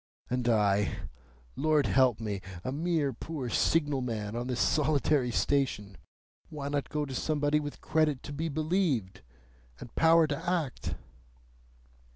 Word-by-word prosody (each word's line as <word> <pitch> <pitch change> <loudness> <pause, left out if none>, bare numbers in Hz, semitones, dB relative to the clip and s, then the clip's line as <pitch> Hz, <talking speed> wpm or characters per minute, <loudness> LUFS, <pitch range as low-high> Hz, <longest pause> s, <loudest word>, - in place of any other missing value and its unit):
And 125 -1 0
I, 105 -2 +2 0.6
Lord 155 -1 +2
help 130 -4 +3
me! 105 -4 -3 0.2
A 130 - -2
mere 155 -2 0
poor 135 0 -5
signal 145 -2 +2
man 110 -3 -3
on 120 +1 -3
this 125 -2 -2
solitary 145 -3 +2
station! 120 -6 0 0.5
Why 145 -2 -5
not 145 -1 -2
go 150 -1 -1
to 135 - -7
somebody 150 +2 +1
with 145 -1 -6
credit 150 -4 +1
to 145 - -7
be 160 +3 -2
believed, 155 - 0 0.6
and 120 - -10
power 165 0 +5
to 150 +3 -3
act?" 165 -8 -2
140 Hz, 140 wpm, -30 LUFS, 120-155 Hz, 0.6 s, power